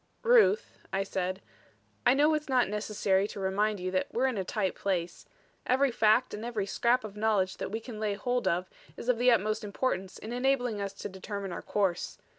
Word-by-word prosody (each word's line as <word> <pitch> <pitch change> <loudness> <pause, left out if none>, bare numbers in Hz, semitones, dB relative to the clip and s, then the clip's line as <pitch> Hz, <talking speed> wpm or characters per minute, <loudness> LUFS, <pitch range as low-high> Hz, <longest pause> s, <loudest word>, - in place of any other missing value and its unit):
"Ruth," 470 -1 +4
I 195 +1 0
said, 190 0 -3 0.6
"I 245 - +6
know 300 +3 +4
it's 305 -1 -2
not 255 -4 +3
necessary 205 -1 0
to 205 - -8
remind 200 +2 0
you 185 +1 -3
that 185 0 -1
we're 250 +3 +1
in 260 -2 +1
a - - 0
tight 190 0 -1
place. 180 -3 -3 0.4
Every 265 +1 +3
fact 225 +3 +3
and 210 - -5
every 230 -4 -2
scrap 240 +5 +1
of 210 -2 -8
knowledge 210 -3 +1
that - - -4
we 220 +3 -3
can 230 -1 -8
lay 210 -2 -1
hold 245 +1 -1
of 180 0 +1 0.3
is 240 - -5
of 240 -2 +2
the 250 +1 +5
utmost 215 -2 +2
importance 200 -2 -2
in 220 +2 -7
enabling 245 -4 +1
us 200 -1 -3
to - - -6
determine 195 0 -6
our 175 - -5
course. 195 -4 -1
210 Hz, 205 wpm, -29 LUFS, 195-245 Hz, 0.6 s, I